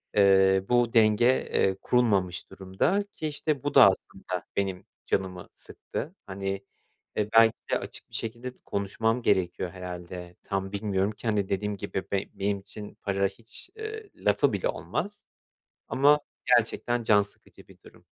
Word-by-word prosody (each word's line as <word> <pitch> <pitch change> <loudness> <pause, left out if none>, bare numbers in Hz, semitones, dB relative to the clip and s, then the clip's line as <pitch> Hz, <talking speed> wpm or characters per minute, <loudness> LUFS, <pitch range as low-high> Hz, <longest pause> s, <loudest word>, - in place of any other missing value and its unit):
eee, 95 -1 +5
bu 120 -1 +3
denge, 110 0 +5 0.3
eee, 95 -1 +2
kurulmamış 100 -8 +1
durumda 95 - 0
ki, 155 - -4
işte, 150 -2 -2
bu 145 0 -1
da, 135 - +10
aslında, 95 -1 -6
benim 95 -2 -2 0.2
canımı 95 -2 -1
sıktı. 165 +7 -7
Hani, 95 0 -4 0.5
e, 105 +1 0
belki 115 0 +7 0.2
de - - +2
açık - - -9
bir - - -10
şekilde 120 +3 -3
t - - -30
konuşmam 110 +4 0
gerekiyor 90 -3 +1
herhâlde. 90 -1 -8
Tam 95 -1 -3
bilmiyorum 100 0 0
ki, 110 - -8
hani, 105 -3 +1
dediğim 105 +1 -1
gibi 95 0 -4
be 100 -1 0
benim 100 0 -1
için 105 +1 -9
para 100 -1 +1
hiç, 110 +4 -2
ııı, 440 0 -5
lafı - - +2
bile - - 0
olmaz 205 - -4 0.6
ama 145 +3 +5 0.4
gerçekten 120 +1 -1
can 105 -2 +5
sıkıcı 100 - -18
bir - - -18
durum. - - -17
100 Hz, 150 wpm, -27 LUFS, 95-120 Hz, 0.6 s, da